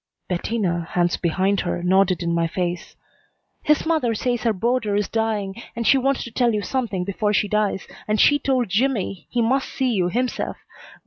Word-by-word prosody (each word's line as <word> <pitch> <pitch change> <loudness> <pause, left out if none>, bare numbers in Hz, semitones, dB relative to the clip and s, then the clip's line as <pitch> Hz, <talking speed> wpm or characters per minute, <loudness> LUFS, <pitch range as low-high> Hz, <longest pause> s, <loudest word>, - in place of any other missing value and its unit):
Bettina, 180 -2 -1
hands 175 -1 +2
behind 190 +3 0
her, 175 -1 -2
nodded 185 -1 +3
in 170 0 0
my 170 0 +1
face. 175 0 -3 0.7
"His 300 0 +2
mother 310 -9 +1
says 240 +1 -1
her 230 - +2
boarder 220 +1 0
is 205 -1 +1
dying 220 -2 -2
and 235 0 -3
she 270 - +5
wants 270 +1 0
to 235 - -8
tell 235 -2 +2
you 210 - -1
something 225 -9 -2
before 205 +2 -1
she 205 - +2
dies, 210 -2 0 0.2
and 215 0 +1
she 290 0 +5
told 260 -4 +1
Jimmy 200 - -1
he 240 -1 0
must 265 +4 +1
see 260 -2 0
you 185 -5 +1
himself. 245 +5 -2
210 Hz, 185 wpm, -22 LUFS, 185-245 Hz, 0.7 s, she